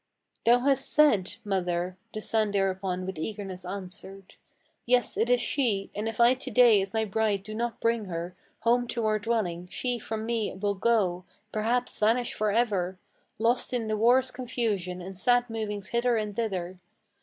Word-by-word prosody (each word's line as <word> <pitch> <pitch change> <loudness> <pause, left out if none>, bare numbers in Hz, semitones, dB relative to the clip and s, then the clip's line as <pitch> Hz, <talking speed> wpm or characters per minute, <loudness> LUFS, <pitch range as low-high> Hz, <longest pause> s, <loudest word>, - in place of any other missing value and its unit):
"Thou 240 +1 +5
has 275 0 +2
said, 275 -14 +3
mother!" 180 -2 -1 0.2
the 215 - -5
son 220 -1 +1
thereupon 190 -2 -1
with 190 -4 -5
eagerness 190 0 -5
answered. 190 +1 -8 0.5
"Yes, 245 -2 +3
it 230 - +1
is 245 0 +4
she; 230 -7 0
and 215 +2 -2
if 225 - -8
I 235 +1 +7
to 260 +1 -5
day 235 -4 +6
as 195 0 -4
my 220 0 0
bride 210 -1 0
do 215 +2 -8
not 235 +1 -3
bring 230 -2 +1
her 175 0 -5 0.3
Home 240 +2 +2
to 235 -1 -2
our 215 0 +2
dwelling, 200 -6 -1
she 245 +5 -2
from 220 0 -4
me 225 -4 -1
will 205 0 0
go, 190 -4 +1 0.3
perhaps 230 +3 -1
vanish 230 +3 +2
for 215 0 0
ever, 200 -5 0 0.4
Lost 235 +3 +1
in 235 -3 -1
the 215 - 0
war's 250 +4 +4
confusion 220 -8 -2
and 190 +1 -8
sad 245 +6 +2
movings 210 -3 -4
hither 235 0 +1
and 210 -2 -3
thither. 185 -5 -3
215 Hz, 175 wpm, -28 LUFS, 190-235 Hz, 0.5 s, I